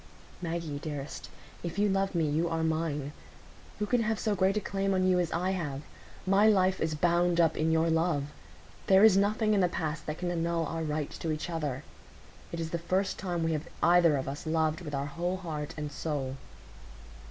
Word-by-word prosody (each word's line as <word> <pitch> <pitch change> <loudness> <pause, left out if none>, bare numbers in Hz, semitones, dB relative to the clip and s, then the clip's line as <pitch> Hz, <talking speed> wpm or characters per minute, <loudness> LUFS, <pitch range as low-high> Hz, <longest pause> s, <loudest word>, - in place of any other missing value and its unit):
"Maggie! 165 -4 -3
Dearest! 145 -2 -6 0.3
If 170 +2 -5
you 205 +1 +3
love 195 -1 0
me, 165 -2 +2
you 160 +3 +1
are 165 0 -1
mine. 155 -3 -1 0.7
Who 210 - -1
can 240 +3 +2
have 220 -1 0
so 215 - 0
great 195 +1 +2
a - - +3
claim 195 -1 -1
on 185 0 +2
you 180 -1 +4
as 175 -2 0
I 180 +3 0
have? 150 -7 -3 0.4
My 195 +3 +5
life 190 -3 +3
is 160 -1 0
bound 175 +2 +2
up 165 -2 +4
in 160 +1 +1
your 160 +1 +3
love. 160 -3 +1 0.6
There 190 +1 +6
is 220 -3 +8
nothing 215 +2 +2
in 205 - +3
the 180 - +4
past 155 -2 -3
that 155 0 -3
can 175 0 -2
annul 170 -1 0
our 165 +2 -3
right 150 -2 -2
to 165 - -3
each 155 +3 -3
other; 150 -5 -3 0.7
it 170 - -4
is 165 -1 -3
the 170 - -1
first 185 +3 -1
time 175 -3 -2
we 165 - +1
have 155 0 -3 0.2
either 170 -4 +5
of 135 - -3
us 140 +4 -5
loved 160 +1 +1
with 150 -4 -5
our 140 0 -1
whole 175 +5 -2
heart 155 -5 -5
and 150 -1 -4
soul." 140 -3 -3
165 Hz, 210 wpm, -30 LUFS, 155-185 Hz, 0.7 s, is